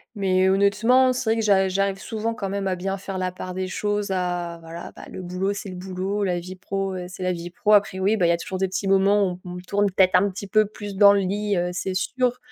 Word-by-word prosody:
mais 190 Hz, -1 st, +2 dB
honnêtement, 210 Hz, +7 st, +4 dB
c'est 250 Hz, -3 st, -1 dB
vrai 225 Hz, -, +1 dB
que -, -, +1 dB
j'a 195 Hz, -2 st, +4 dB
j'arrive 195 Hz, +1 st, 0 dB
souvent 225 Hz, +1 st, -3 dB
quand 195 Hz, -, -4 dB
même 195 Hz, 0 st, -2 dB
à 185 Hz, -, 0 dB
bien 195 Hz, +2 st, -3 dB
faire 195 Hz, -1 st, -5 dB
la 185 Hz, 0 st, -1 dB
part 185 Hz, 0 st, -7 dB
des 185 Hz, 0 st, -2 dB
choses, 205 Hz, +1 st, -2 dB
à 175 Hz, -2 st, -2 dB
voilà, 165 Hz, +1 st, -8 dB
bah, -, -, -10 dB
le 185 Hz, -, -7 dB
boulot, 185 Hz, +3 st, -2 dB
c'est 200 Hz, -1 st, -6 dB
le 185 Hz, -, -7 dB
boulot, 190 Hz, +2 st, -3 dB
la 180 Hz, -2 st, 0 dB
vie 185 Hz, +2 st, -8 dB
pro, 195 Hz, +1 st, -3 dB
heu, 180 Hz, -1 st, -5 dB
c'est 185 Hz, 0 st, -7 dB
la 185 Hz, -, +1 dB
vie 175 Hz, 0 st, -5 dB
pro. 210 Hz, +4 st, +1 dB
Après 200 Hz, -2 st, +3 dB
oui, 200 Hz, +4 st, +2 dB
bah, 180 Hz, -5 st, +2 dB
il -, -, +2 dB
y -, -, +5 dB
a 170 Hz, -, +2 dB
toujours 185 Hz, +2 st, -5 dB
des 190 Hz, -, +1 dB
petits 190 Hz, +1 st, -3 dB
moments 195 Hz, -1 st, +3 dB
où 180 Hz, -, -9 dB
on 180 Hz, -, -6 dB
tourne 205 Hz, 0 st, +2 dB
peut-être 185 Hz, 0 st, +3 dB
un 200 Hz, +2 st, +4 dB
petit 195 Hz, +2 st, -7 dB
peu 215 Hz, +1 st, +3 dB
plus 205 Hz, -1 st, -8 dB
dans 200 Hz, -1 st, +8 dB
le 200 Hz, -, +3 dB
lit, 200 Hz, +1 st, -1 dB
heu, 175 Hz, 0 st, 0 dB
c'est 185 Hz, +1 st, -3 dB
sûr, 250 Hz, +4 st, 0 dB
195 Hz, 275 wpm, -23 LUFS, 185-205 Hz, -, dans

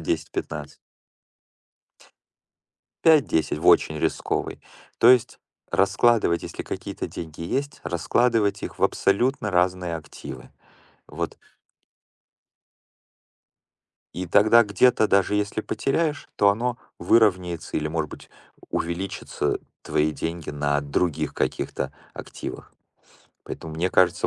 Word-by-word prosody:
10-15. 75 Hz, -1 st, -4 dB, 2.3 s
5-10 130 Hz, -, +3 dB
в -, -, -3 dB
очень 80 Hz, 0 st, +5 dB
рисковый. -, -, -2 dB, 0.4 s
То 115 Hz, -, +6 dB
есть 125 Hz, -3 st, +4 dB, 0.3 s
раскладывать, 115 Hz, -8 st, +3 dB
если -, -, -6 dB
какие-то -, -, -5 dB
деньги 80 Hz, -1 st, -8 dB
есть, 140 Hz, +11 st, -3 dB
раскладывать 100 Hz, +6 st, +1 dB
их -, -, -6 dB
в -, -, +3 dB
абсолютно 115 Hz, +2 st, +1 dB
разные 90 Hz, -1 st, +1 dB
активы. 75 Hz, -3 st, -10 dB, 0.6 s
Вот. -, -, -5 dB, 2.8 s
И 90 Hz, 0 st, -4 dB
тогда 110 Hz, +6 st, +6 dB
где-то 110 Hz, +2 st, +3 dB
даже 100 Hz, +1 st, +3 dB
если 105 Hz, +1 st, -1 dB
потеряешь, 145 Hz, +7 st, -1 dB
то 100 Hz, -, +5 dB
оно 120 Hz, +4 st, -1 dB, 0.2 s
выровняется 90 Hz, -7 st, +2 dB
или, 75 Hz, 0 st, -1 dB
может 80 Hz, -1 st, -2 dB
быть, -, -, -12 dB, 0.4 s
увеличится 90 Hz, +3 st, -2 dB, 0.2 s
твои 75 Hz, +1 st, +1 dB
деньги 80 Hz, 0 st, -4 dB
на 75 Hz, 0 st, 0 dB
других 70 Hz, +3 st, -1 dB
каких-то -, -, -2 dB, 0.2 s
активах, -, -, -8 dB, 0.7 s
поэтому 80 Hz, -1 st, -7 dB
мне 90 Hz, +3 st, 0 dB
кажется 90 Hz, -1 st, +3 dB
90 Hz, 100 wpm, -24 LUFS, 80-115 Hz, 2.8 s, То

